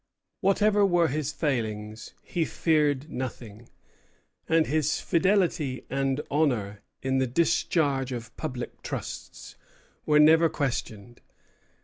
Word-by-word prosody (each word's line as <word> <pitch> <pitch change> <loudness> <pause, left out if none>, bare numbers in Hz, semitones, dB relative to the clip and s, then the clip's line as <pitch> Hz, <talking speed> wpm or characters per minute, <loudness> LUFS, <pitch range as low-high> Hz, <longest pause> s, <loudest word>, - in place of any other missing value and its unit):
Whatever 205 +1 +3
were 175 -4 +3
his 150 +1 -2
failings, 110 -7 -3
he 170 - -1
feared 150 -3 +1
nothing, 120 -3 -7 0.8
and 160 -1 +4
his 155 0 0
fidelity 175 - +1
and 135 +1 0
honor 120 -10 0 0.2
in 130 0 +1
the 130 - +1
discharge 145 -2 +1
of 120 -2 -7
public 125 -2 -6
trusts - - -7 0.5
were 150 - +4
never 160 +2 +6
questioned. 120 -5 -4
145 Hz, 105 wpm, -27 LUFS, 125-165 Hz, 0.8 s, never